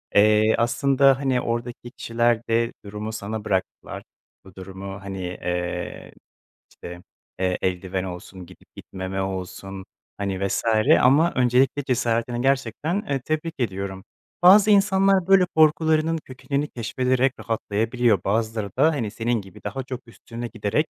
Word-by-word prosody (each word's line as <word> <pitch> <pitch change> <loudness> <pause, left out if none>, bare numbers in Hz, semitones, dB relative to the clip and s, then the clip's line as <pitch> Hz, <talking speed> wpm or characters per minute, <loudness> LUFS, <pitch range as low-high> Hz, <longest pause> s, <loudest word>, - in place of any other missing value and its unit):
Eee, 110 +1 +5
aslında, 135 +3 +3
hani, 130 -3 0
oradaki 120 +1 -4
kişiler 115 0 +1
de 115 0 +1
durumu 105 +2 -5
sana 110 0 -5
bıraktılar. 95 -3 -3 0.4
Bu 95 -1 -16
durumu, 95 +1 -8
hani, 95 0 -6
eee, 90 -1 -4 0.6
işte, 90 0 -10 0.4
eee, 95 -1 0
eldiven 95 0 -2
olsun, 90 0 -8
gidip 90 +1 -19
gitmeme 95 0 -5
olsun, 95 0 -6 0.3
hani, 100 -1 -2
vs. - - -2 0.4
ama 145 +7 +4
öncelikle 130 +3 +2
cesaretini 120 -1 -1
gerçekten, 135 - 0
eee, 135 -2 -1
tebrik 155 +1 -2
ediyorum. 95 -4 -3 0.4
Bazı 200 +4 +7
insanlar 195 -2 +3
böyle, 195 -1 +6
korkularının 160 +1 +3
kökenini 140 0 -4
keşfederek 125 +1 0
rahatlayabiliyor, 115 -1 0
bazıları 110 0 -1
da, 155 +5 +5
hani, 120 -9 -3
senin 115 +1 -1
gibi 95 -3 -15
daha 135 - -4
çok 130 -1 -6
üstüne 115 +1 -8
giderek, 115 +6 -1
115 Hz, 130 wpm, -23 LUFS, 95-135 Hz, 0.6 s, Bazı